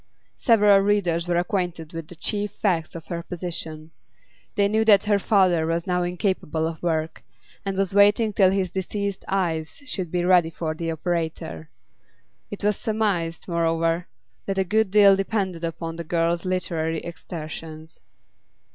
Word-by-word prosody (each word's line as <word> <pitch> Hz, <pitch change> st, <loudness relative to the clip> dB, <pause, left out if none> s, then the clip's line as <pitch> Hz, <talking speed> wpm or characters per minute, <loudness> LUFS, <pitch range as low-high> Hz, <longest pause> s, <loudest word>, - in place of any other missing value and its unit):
Several 210 Hz, -4 st, +5 dB
readers 190 Hz, -4 st, +1 dB
were 175 Hz, -1 st, +1 dB
acquainted 175 Hz, -3 st, -2 dB
with 165 Hz, -1 st, -6 dB
the 175 Hz, -, -12 dB
chief 205 Hz, +5 st, -1 dB
facts 170 Hz, -6 st, -1 dB
of 165 Hz, -, -8 dB
her 170 Hz, -2 st, -4 dB
position; 165 Hz, -3 st, -6 dB, 0.6 s
they 200 Hz, -1 st, +3 dB
knew 220 Hz, +2 st, +2 dB
that 205 Hz, -3 st, +6 dB
her 205 Hz, -1 st, +2 dB
father 185 Hz, -6 st, +3 dB
was 165 Hz, 0 st, -1 dB
now 180 Hz, -1 st, 0 dB
incapable 175 Hz, -3 st, -1 dB
of 165 Hz, -1 st, -4 dB
work, 160 Hz, -2 st, -1 dB, 0.4 s
and 195 Hz, -1 st, -3 dB
was 195 Hz, -1 st, 0 dB
waiting 205 Hz, +2 st, +4 dB
till 190 Hz, -2 st, +5 dB
his 190 Hz, -2 st, 0 dB
diseased 200 Hz, +1 st, -3 dB
eyes 165 Hz, -5 st, -1 dB
should 185 Hz, -, -3 dB
be 175 Hz, +1 st, -1 dB
ready 180 Hz, -3 st, +5 dB
for 160 Hz, -1 st, -3 dB
the 165 Hz, +1 st, -4 dB
operator; 160 Hz, -1 st, -3 dB, 0.8 s
it 205 Hz, -, -8 dB
was 210 Hz, -1 st, +2 dB
surmised, 200 Hz, -7 st, -1 dB
moreover, 165 Hz, 0 st, 0 dB, 0.4 s
that 195 Hz, -1 st, -2 dB
a 190 Hz, -, +3 dB
good 215 Hz, +3 st, +1 dB
deal 200 Hz, 0 st, +7 dB
depended 195 Hz, -3 st, -2 dB
upon 165 Hz, 0 st, -4 dB
the 170 Hz, -, -4 dB
girl's 170 Hz, +1 st, 0 dB
literary 165 Hz, -3 st, -1 dB
exertions. 160 Hz, -1 st, -8 dB
175 Hz, 155 wpm, -24 LUFS, 165-195 Hz, 0.8 s, deal